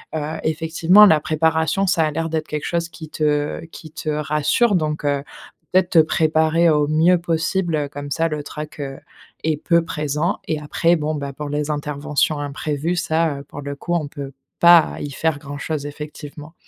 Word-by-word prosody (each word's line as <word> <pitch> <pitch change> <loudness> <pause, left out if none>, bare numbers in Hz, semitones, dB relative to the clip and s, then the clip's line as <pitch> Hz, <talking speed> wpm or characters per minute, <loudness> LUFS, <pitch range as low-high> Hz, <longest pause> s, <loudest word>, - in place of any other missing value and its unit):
heu, 155 +1 -3
effectivement, 165 +6 +5
la 160 -5 +5
préparation, 160 +5 +1
ça 170 -2 +3
a 155 - -1
l'air 165 +2 -2
d'être 160 -1 -2
quelque 150 -1 -4
chose 170 -1 -1
qui 160 -2 -10
te 150 0 -1
qui 155 - -11
te 155 - -5
rassure, 150 +9 +1
donc, 155 -3 -1
heu, 140 -1 0 0.5
peut-être 185 -1 +3
te 165 - +6
préparer 160 +1 +3
au 150 -2 +2
mieux 165 +4 +4
possible, 170 +1 -1
heu, 145 -2 -2
comme 145 0 -7
ça 165 +3 +1
le 150 -1 -4
trac, 150 +1 -8
heu, 135 -1 -5 0.5
est 155 -1 0
peu 170 -1 +3
présent 150 +2 -2
et 155 - 0
après 165 +3 +1
bon, 155 -1 -2
bah, 140 -1 -5
pour 150 +1 -6
les 145 +1 -2
interventions 145 0 -1
imprévues, 145 +3 -2
ça, 160 -4 0
heu, - - -9
pour 145 - -10
le 140 0 -5
coup, 175 +4 -4
on 155 -4 -1
peut 140 -1 -7 0.3
pas 170 -2 +7
y 145 - -5
faire 160 +2 -1
grand-chose, 145 +1 -5
effectivement. 150 +1 -9
155 Hz, 185 wpm, -21 LUFS, 145-165 Hz, 0.5 s, pas